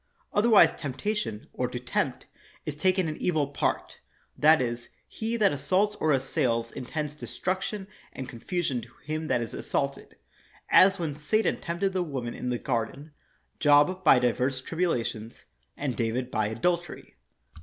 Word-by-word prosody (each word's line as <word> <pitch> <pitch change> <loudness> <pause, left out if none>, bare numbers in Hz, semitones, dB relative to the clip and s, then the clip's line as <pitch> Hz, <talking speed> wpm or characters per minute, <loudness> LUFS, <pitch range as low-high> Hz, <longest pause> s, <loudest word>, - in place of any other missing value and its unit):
Otherwise 215 0 +6
temptation, 145 - -3
or - - -1
to - - -5
tempt, - - -2 0.4
is 150 - -3
taken 185 +3 +2
in 155 - -3
evil 155 -5 +1
part; 145 - -2 0.4
that 155 +1 +6
is, 120 -1 -3 0.2
he 230 +1 -3
that 205 -3 +4
assaults 185 +9 +1
or 155 - +2
assails 120 -4 0
intends 150 +3 -4
destruction 190 +5 -3 0.2
and 130 - -6
con 125 -2 -9
fusion 155 -6 -1
to 115 - -12
him 155 +2 -3
that 120 - +1
is 115 - -5
assaulted. - - -3 0.6
As 195 +1 +7
when 160 -5 -3
Satan 155 +9 +1
tempted 180 +3 -2
the 185 - +1
woman 130 -8 -3
in 125 - -4
the 125 - 0
garden, 130 +5 -3 0.5
Job 150 +6 +4
by 150 -6 +7
divers 125 +2 +1
tribulations, 125 -8 -2 0.3
and 140 -4 -2
David 125 +2 -1
by 110 -1 +1
adultery. 170 +10 -2
150 Hz, 150 wpm, -28 LUFS, 125-180 Hz, 0.6 s, As